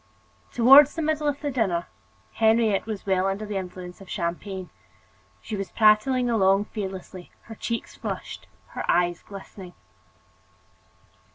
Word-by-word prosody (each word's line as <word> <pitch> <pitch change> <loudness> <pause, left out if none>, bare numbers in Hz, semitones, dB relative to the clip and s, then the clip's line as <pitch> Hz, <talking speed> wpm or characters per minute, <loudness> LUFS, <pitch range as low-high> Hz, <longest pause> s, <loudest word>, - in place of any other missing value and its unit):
Toward 270 +4 +8
the 325 +2 -5
middle 305 -1 0
of 285 -1 -1
the 290 - -2
dinner, 195 -9 0 0.5
Henriette 220 -2 +2
was 215 -3 -5
well 190 -1 +1
under 195 +2 -3
the 210 -1 -5
influence 180 0 -8
of 195 - -13
champagne. 180 +2 -4 0.7
She 220 - -5
was 195 -1 -4
prattling 230 +4 +3
along 200 -3 +3
fearlessly, 190 -4 -7
her 225 - -11
cheeks 230 +1 -4
flushed, - - -6 0.2
her - - -5
eyes 175 0 +2
glistening. 190 -2 -11
205 Hz, 130 wpm, -25 LUFS, 190-230 Hz, 0.7 s, Toward